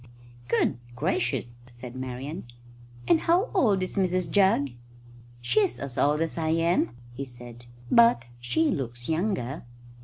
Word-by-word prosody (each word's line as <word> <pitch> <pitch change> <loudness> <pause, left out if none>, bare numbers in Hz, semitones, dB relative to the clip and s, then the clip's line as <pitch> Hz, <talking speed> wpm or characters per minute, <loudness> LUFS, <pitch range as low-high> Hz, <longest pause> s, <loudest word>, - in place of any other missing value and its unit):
"Good 120 - +1 0.2
gracious!" 120 0 -1 0.2
said 120 0 -10
Marian. 130 +6 -5 0.6
"And 165 +1 +5
how 355 +7 +2
old 210 - +3
is 185 - -4
Mrs 185 -1 +1
Jugg?" 190 -9 +3 0.7
"She's 400 - +1
as 140 -3 -5
old 150 +3 +2
as 165 +1 -2
I 160 -1 0
am," 165 -6 +1 0.2
he 135 +3 -5
said, 120 -2 -11 0.2
"but 230 - +5
she 125 +7 +1
looks 120 -3 -4
younger." 160 - -1
150 Hz, 130 wpm, -27 LUFS, 120-185 Hz, 0.7 s, And